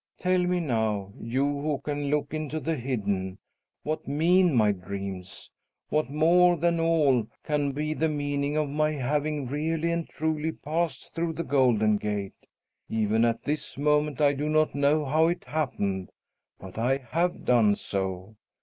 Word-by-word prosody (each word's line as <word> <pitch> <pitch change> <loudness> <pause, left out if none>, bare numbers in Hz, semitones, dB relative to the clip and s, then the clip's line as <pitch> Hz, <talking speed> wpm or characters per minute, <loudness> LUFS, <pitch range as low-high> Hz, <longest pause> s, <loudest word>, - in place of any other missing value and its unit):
"Tell 185 0 +2
me 180 0 +1
now, 110 - -1
you 125 +4 -1
who 145 +1 -1
can 145 +1 -3
look 145 0 -1
into 155 0 -3
the 160 +1 -1
hidden, 100 -8 -2 0.5
what 155 +1 -3
mean 170 +3 +3
my 110 -3 +4
dreams? 95 0 -7 0.4
What, 155 -2 0
more 175 +4 +4
than 170 +1 +1
all, 150 -8 +3 0.2
can 145 -2 0
be 150 +3 -2
the 160 +1 0
meaning 145 0 -1
of 155 -1 +1
my 155 +2 0
having 145 +1 -1
really 160 +5 -1
and 170 -1 -2
truly 160 0 -2
passed 155 -2 -3
through 165 -1 -1
the 170 - -3
Golden 120 -7 +3
Gate? 105 -2 -4 0.4
Even 110 0 +1
at 115 -1 +1
this 150 -1 -3
moment 150 -1 +1
I 145 -1 +4
do 145 +2 -2
not 155 0 +2
know 145 +2 +2
how 155 +4 +3
it 175 +1 -1
happened, 100 -11 -2 0.5
but 95 +3 -9
I 130 +4 +2
have 165 +7 -2
done 110 -4 +4
so. 95 +1 -4
145 Hz, 160 wpm, -27 LUFS, 115-155 Hz, 0.5 s, my